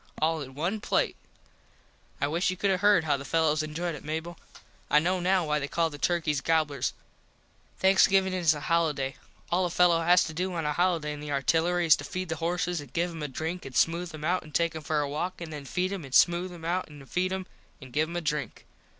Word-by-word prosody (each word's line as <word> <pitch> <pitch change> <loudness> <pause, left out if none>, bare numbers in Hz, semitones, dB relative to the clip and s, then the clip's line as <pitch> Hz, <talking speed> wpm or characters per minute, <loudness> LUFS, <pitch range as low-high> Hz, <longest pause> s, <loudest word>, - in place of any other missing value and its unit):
All 160 0 +1
in 130 -1 -9
one 180 +8 -2
plate. - - 0 1.0
I - - +1
wish 165 +6 0
you 185 - -3
could 200 +1 +1
have 185 - +1
heard 205 -2 +4
how 150 -2 +1
the 140 - -7
fellos 155 0 +1
enjoyed 165 +3 -3
it 150 - -9
Mable. 160 +3 -5 0.5
I - - +5
know 180 +4 +2
now 180 0 +2
why 150 0 +1
they 140 - -3
call 165 +2 0
the 145 - -9
turkys 155 -5 0
gobblers. 155 -2 0 0.9
Thanksgivin 190 0 +4
is 170 -4 +3
a 145 - -7
holiday. 150 -4 0 0.3
All 180 +2 +2
a 175 - 0
fello 175 -1 +4
has 175 +2 +5
to 160 - -5
do 180 +3 -2
on 165 -2 -2
a 150 - 0
holiday 170 -3 +1
in 150 - -8
the 150 0 -6
artillery 165 +5 +1
is 160 - +7
to - - -7
feed 185 -1 -5
the 160 - -2
horses 170 0 -1
an 145 - -12
give 175 +1 0
em 165 -2 -8
a 150 - -2
drink 160 +6 -4
an 135 - -9
smooth 170 +1 +1
em 150 - -9
out 180 +3 +1
an 155 -2 -14
take 170 -1 +1
em 160 - -5
for 150 0 0
a 145 - -1
walk 175 +6 -3
an 170 -2 -7
then 145 -2 -7
feed 185 +7 -1
em 190 -5 -5
an 135 -2 -10
smooth 175 +4 +4
em 170 -2 -10
out 180 +2 -1
an 145 -2 -12
feed 185 +6 -1
em 190 0 -3 0.3
an 130 -2 -12
give 155 +5 0
em 170 - -7
a 175 - -1
drink. 150 -2 -3
165 Hz, 245 wpm, -28 LUFS, 150-180 Hz, 1.0 s, is